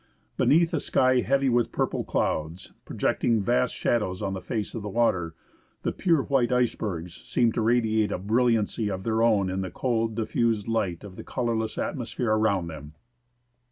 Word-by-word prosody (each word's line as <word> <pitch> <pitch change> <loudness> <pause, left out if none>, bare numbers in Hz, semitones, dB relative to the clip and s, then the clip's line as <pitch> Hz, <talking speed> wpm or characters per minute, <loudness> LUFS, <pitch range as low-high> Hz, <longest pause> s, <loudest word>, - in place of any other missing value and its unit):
Beneath 165 +3 +3
a 160 - +1
sky 130 -2 +2
heavy 140 +2 +1
with 120 -2 +2
purple - - -1
clouds, 80 +4 -2
projecting 115 -2 0
vast 65 -10 +1
shadows 100 -6 0
on 95 -1 -2
the 95 - -5
face 110 -3 -4
of 115 - -4
the 105 - -5
water, 95 -7 0 0.5
the - - 0
pure 165 -6 +1
white 130 -3 +1
icebergs 105 -8 -1
seem 120 -2 +1
to 115 - -2
radiate 110 -2 +2
a - - -1
brilliancy 110 +1 +1
of 95 -1 -4
their 115 +1 0
own 110 -5 +3
in 95 +1 -2
the 95 - -4
cold, 115 +2 -1
diffused 115 -1 0
light 100 -7 -1
of 95 -2 -11
the - - -7
colourless 115 -3 -2
atmosphere 120 -3 -2
around 110 -4 +2
them. 75 -2 -9
110 Hz, 170 wpm, -26 LUFS, 95-120 Hz, 0.5 s, Beneath